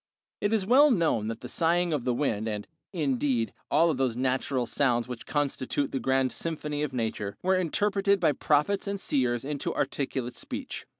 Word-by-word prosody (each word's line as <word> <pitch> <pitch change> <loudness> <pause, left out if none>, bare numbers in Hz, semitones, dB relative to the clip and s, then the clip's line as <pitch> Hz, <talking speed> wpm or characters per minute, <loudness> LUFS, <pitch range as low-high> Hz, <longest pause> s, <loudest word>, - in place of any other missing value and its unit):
It 205 - 0
is 215 -4 +1
well 270 +7 +6
known 165 - +2
that 115 0 -5
the - - -6
sighing 170 0 +1
of 135 -5 -2
the 125 - +2
wind, 110 -6 -1
and, 105 -2 -4 0.2
indeed, 135 - 0 0.2
all 165 +2 +4
those 130 -3 -1
natural 130 0 0
sounds 120 -2 +1
which 125 -2 -7
constitute 145 -1 -1
the 135 - -1
grand 130 0 +1
symphony 150 -3 -3
of 150 -2 -1
Nature, 110 -5 -3
were 190 +1 +3
interpreted 200 +3 +1
by 165 -4 +3
prophets 150 +9 +1
and 200 0 -2
seers 125 -6 0
into 145 -1 -3
articulate 130 -2 -2
speech. - - -7
140 Hz, 175 wpm, -28 LUFS, 125-170 Hz, 0.2 s, well